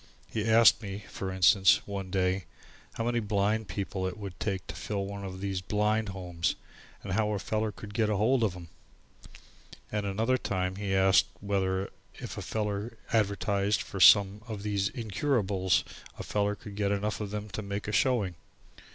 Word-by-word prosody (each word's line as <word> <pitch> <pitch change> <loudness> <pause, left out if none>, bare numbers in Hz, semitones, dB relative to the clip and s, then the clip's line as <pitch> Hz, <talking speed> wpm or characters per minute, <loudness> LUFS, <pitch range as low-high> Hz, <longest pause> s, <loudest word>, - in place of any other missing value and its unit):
He 110 0 -2
asked 115 0 +6
me, 100 -1 -6
for 95 -1 -4
instance, 95 +1 +5
one 100 -2 -5
day, 95 0 0 0.5
how 115 - -3
many 120 0 +1
blind 105 0 0
people 95 -2 -3
it 95 - -5
would 100 -4 -8
take 95 -3 -2
to - - -7
fill 100 -2 -3
one 100 0 -6
of 95 -1 -6
these 95 -2 -2
blind 105 +2 0
homes 90 -3 -2 0.5
and - - -4
how 105 +1 +1
a - - 0
feller 110 +2 -1
could 105 0 -10
get 110 -1 +1
ahold 110 +5 +2
of 105 -5 +1
them. 85 -2 -10 1.2
And 105 -1 -1
at - - -1
another 115 +6 +1
time 95 -3 -2
he 100 -1 -1
asked 95 0 +5
whether 95 -1 -1 0.2
if - - -7
a - - -5
feller 105 +1 -3 0.2
advertised 100 -1 +1
for 100 - -7
some 100 +3 +7
of 105 -3 -6
these 100 -1 0
incurables 105 -5 0 0.3
a - - -5
feller 105 0 0
could 100 0 -10
get 100 -1 0
enough 100 +1 -1
of 105 - -3
them 105 +1 -4
to 100 +3 -4
make 100 0 -5
a - - -2
showing. 110 -6 +2
100 Hz, 180 wpm, -29 LUFS, 95-105 Hz, 1.2 s, some